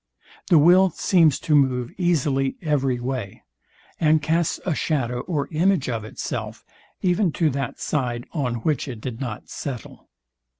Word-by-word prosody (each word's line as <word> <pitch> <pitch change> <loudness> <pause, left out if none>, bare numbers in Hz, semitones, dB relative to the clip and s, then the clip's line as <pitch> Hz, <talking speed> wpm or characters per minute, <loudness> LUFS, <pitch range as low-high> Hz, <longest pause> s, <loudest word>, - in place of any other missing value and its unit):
The 170 - +6
will 180 +5 +6
seems 165 -3 +3
to 155 - 0
move 130 -4 +2
easily 145 -6 +1
every 135 -5 +1
way, 120 -5 -5 0.6
and 155 -1 +4
casts 160 +3 0
a 180 - +1
shadow 125 -6 -1
or 145 -2 -2
image 170 -2 +2
of 115 -3 -2
itself, 110 - -5 0.4
even 180 0 +2
to 160 -3 +1
that 135 -1 -4
side, 120 -5 -2
on 130 -7 -1
which 150 -3 0
it 120 -5 -6
did 120 +1 -6
not 120 -5 -5
settle. 130 -5 -7
140 Hz, 145 wpm, -23 LUFS, 125-165 Hz, 0.6 s, The